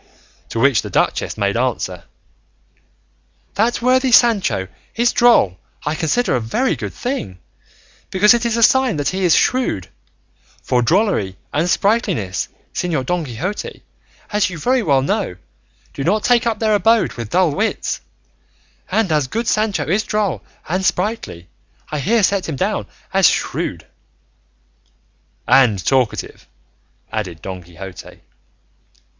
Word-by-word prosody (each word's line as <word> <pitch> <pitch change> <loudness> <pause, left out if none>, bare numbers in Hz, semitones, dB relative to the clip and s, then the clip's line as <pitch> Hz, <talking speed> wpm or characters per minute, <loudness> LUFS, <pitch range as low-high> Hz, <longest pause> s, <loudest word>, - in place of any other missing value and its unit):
To 115 - -3
which 135 -3 +4
the - - -7
duchess - - 0
made 100 -1 0
answer, 115 -8 -2 1.5
"that 230 +3 0
worthy 255 +1 +3
Sancho 220 - +4 0.3
is 240 +1 +2
droll 165 - +4 0.3
I 150 - 0
consider 165 - 0
a - - +1
very 185 - 0
good - - -6
thing, 240 - -4 0.7
because 205 +4 +5
it 240 0 0
is 235 -1 0
a 230 - +3
sign 265 - +4
that 145 - 0
he 190 +1 -2
is 175 -4 +5
shrewd; 250 - +1 0.7
for 125 - +1
drollery 120 - +1 0.2
and 160 +4 +1
sprightliness, 195 - 0 0.3
Señor 165 -7 -1
Don 175 +3 -1
Quixote, 150 - -5 0.5
as 210 -2 +2
you 180 - -7
very 250 - +1
well 140 -9 +2
know, 110 -8 -1 0.6
do 135 - -4
not 205 +7 +1
take 240 -1 +3
up 225 - 0
their 220 -1 +1
abode 225 +2 +3
with 115 -2 -6
dull 180 +1 +3
wits; 220 +10 -2 0.9
and 220 -6 +1
as 150 -4 +1
good 230 - -3
Sancho 215 -2 +1
is 195 +7 +2
droll 210 -5 -1 0.3
and 185 +4 -1
sprightly 190 - -2 0.4
I 150 - -2
here 220 - +2
set 190 -2 +1
him 155 - -3
down - - -1 0.3
as - - +6
shrewd." - - -3 1.6
"And 125 -6 +5
talkative," 130 -4 -1 0.6
added 95 -7 -4
Don 95 -1 -6
Quixote. 90 +2 -11
180 Hz, 140 wpm, -19 LUFS, -, 1.6 s, as